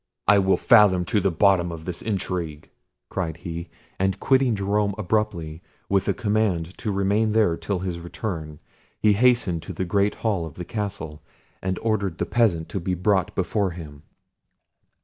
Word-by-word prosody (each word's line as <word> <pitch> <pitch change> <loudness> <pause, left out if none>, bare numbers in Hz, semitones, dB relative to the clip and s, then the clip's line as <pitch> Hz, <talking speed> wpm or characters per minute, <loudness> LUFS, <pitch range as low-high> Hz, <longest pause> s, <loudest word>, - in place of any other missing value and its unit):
"I 105 -1 +6
will 95 0 +3
fathom 100 -6 +5
to 105 - +1
the 95 - +2
bottom 90 0 +3
of 80 -1 -8
this 90 -2 -5
intrigue," 90 -7 -3 0.4
cried 85 -4 -3
he; 85 -1 -6 0.3
and 95 0 0
quitting 130 -3 +3
Jerome 100 0 0
abruptly, 90 -6 -1 0.3
with 100 -1 +1
a - - +3
command 105 -7 0
to 110 - -2
remain 100 +3 +1
there 105 -7 +3
till 100 +3 -3
his 90 -2 -4
return, 85 -3 -5 0.4
he 105 -1 +4
hastened 110 -6 +2
to 85 - -7
the 95 - -2
great 100 +3 +1
hall 95 -7 +1
of 75 - -12
the 90 - -6
castle, 100 -9 -5 0.4
and 95 -1 -2
ordered 100 -6 0
the - - -1
peasant 100 -10 +1
to 95 - -3
be 90 +1 -2
brought 95 +1 +1
before 95 +2 0
him. 75 -4 -9
95 Hz, 170 wpm, -24 LUFS, 85-105 Hz, 0.4 s, I